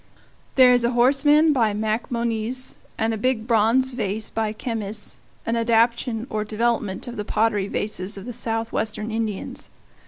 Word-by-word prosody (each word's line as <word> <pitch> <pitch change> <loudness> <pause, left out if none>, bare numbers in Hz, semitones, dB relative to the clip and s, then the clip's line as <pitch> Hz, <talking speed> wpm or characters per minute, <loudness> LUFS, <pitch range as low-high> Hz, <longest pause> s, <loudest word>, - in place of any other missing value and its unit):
There 255 -2 +7
is 245 -1 +3
a 235 +1 +1
horseman 290 +5 +4
by 225 -6 +2
Macmonnies, 230 +3 -2 0.2
and 225 0 0
a 220 - -3
big 240 -1 0
bronze 235 +3 +3
vase 215 -3 -3
by 220 -1 -1
Kemys, 215 -2 -4 0.3
an 230 - 0
adaptation 230 0 +2
or 215 -3 -2
development 215 -1 -1
of 245 - -6
the 210 - -2
pottery 210 -2 +1
vases 205 -1 -2
of 195 - -8
the 245 - -5
Southwestern 225 -1 -2
Indians. 220 -3 -3
225 Hz, 150 wpm, -23 LUFS, 215-240 Hz, 0.3 s, There